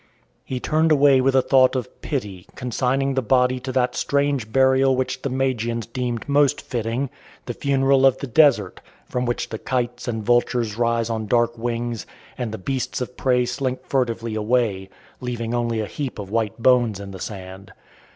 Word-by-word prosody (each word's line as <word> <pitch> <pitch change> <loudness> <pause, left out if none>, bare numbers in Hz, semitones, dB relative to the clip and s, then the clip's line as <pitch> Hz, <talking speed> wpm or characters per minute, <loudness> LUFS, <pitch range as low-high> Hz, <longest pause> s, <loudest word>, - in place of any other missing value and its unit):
He 130 - -4
turned 160 +4 +1
away 140 -3 +5
with 135 +1 +2
a 130 - +4
thought 130 -1 +4
of 125 -1 -5
pity, 100 -10 -4
consigning 130 +2 0
the 130 - +1
body 125 +1 +2
to 130 +1 -5
that 125 -1 +1
strange 140 -5 0
burial 130 +1 +4
which 130 0 -2
the 140 - -2
Magians 120 -3 -1
deem 120 0 -3
most 145 0 +3
fitting 120 +3 -3 0.3
the 120 - -4
funeral 135 0 +2
of 135 - +2
the - - -5
desert, 120 - +3 0.2
from 125 0 -2
which 120 - -2
the 110 - -5
kites 125 -1 -2
and 110 -2 -2
vultures 120 -2 +1
rise 115 0 0
on 110 -1 -3
dark 120 +1 +2
wings, 120 -2 -3 0.3
and 120 -3 -4
the 110 - -5
beasts 130 +6 -3
of 125 0 -5
prey 125 -2 +2
slink 130 0 -3
furtively 115 -4 -1
away, 110 -3 0 0.3
leaving 120 -2 -4
only 120 -2 0
a - - -2
heap 135 +3 -5
of 100 -2 -7
white 110 -1 -1
bones 120 -4 +3
in 100 -1 -8
the 95 - -9
sand. 95 -1 -8
125 Hz, 180 wpm, -22 LUFS, 115-130 Hz, 0.3 s, away